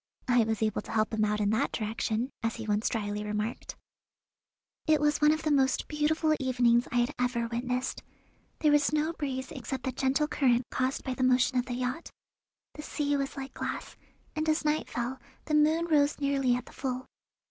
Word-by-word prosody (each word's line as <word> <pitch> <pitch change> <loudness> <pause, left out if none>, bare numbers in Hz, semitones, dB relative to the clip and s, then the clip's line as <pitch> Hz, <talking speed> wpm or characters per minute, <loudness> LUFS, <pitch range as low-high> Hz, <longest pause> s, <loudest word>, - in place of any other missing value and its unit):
I 245 -2 +4
was 220 -1 -1
able 215 -2 0
to - - -10
help 215 0 +1
him 215 -1 +1
out 210 0 +1
in 205 0 +2
that 220 - +1
direction, 220 +3 -2
as 225 0 -1
he 225 - -6
once 210 +1 +1
drily 210 -2 -2
remarked. 210 +2 -3 1.1
It 310 -1 +4
was 295 +1 +1
one 300 0 +6
of 310 +1 -1
the 310 - +1
most 265 -2 +2
beautiful 310 +1 +1
evenings 245 -2 +3
I - - -4
had 240 +4 +2
ever 245 -2 0
witnessed. 250 +2 -2 0.6
There 300 - +4
was 295 -1 +4
no 305 +2 +1
breeze 265 -4 -4
except 265 -1 -5
the 260 - -1
gentle 265 +4 +1
current 250 -4 +2
caused 260 +1 -1
by 260 - -2
the 255 - -5
motion 255 0 +3
of 250 - -2
the 245 - -3
yacht. 255 +6 -3 0.6
The 300 - -8
sea 290 -1 -1
was 275 0 -2
like 270 0 -6
glass, - - -5 0.4
and 310 +1 0
as 310 0 +1
night 300 +1 0
fell 245 +2 -3 0.3
the 310 - -3
moon 310 +2 +4
rose 295 -3 +2
nearly 275 -3 +2
at 250 - -4
the - - -14
full. 255 -1 -3
260 Hz, 200 wpm, -29 LUFS, 235-295 Hz, 1.1 s, one